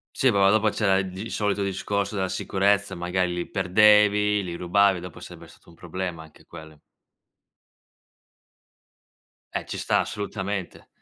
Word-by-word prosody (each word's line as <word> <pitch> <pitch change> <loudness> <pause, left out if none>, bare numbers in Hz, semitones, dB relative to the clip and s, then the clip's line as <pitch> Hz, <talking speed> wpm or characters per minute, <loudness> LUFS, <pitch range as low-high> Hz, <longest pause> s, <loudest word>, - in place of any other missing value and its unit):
Sì, 135 - +3
però 100 -4 +4
dopo 110 0 +2
c'era 100 -2 +2
il 95 -1 -2
g 95 +5 -7
solito 105 -2 -1
discorso 100 +2 -2
della 95 -2 -1
sicurezza, 100 +2 0
magari 90 +1 -1
li 90 0 -4
perdevi, 105 +1 +4
li 85 -2 -5
rubavi, 95 +2 +2
dopo 90 -1 -10
sarebbe - - -11
stato - - -20
un 85 - -17
problema 85 -1 -5
anche 80 - -19
quello. 80 -3 -13 2.7
Eh - - -3
ci - - -6
sta, - - +1
assolutamente. 100 -2 -5
95 Hz, 140 wpm, -24 LUFS, 90-105 Hz, 2.7 s, però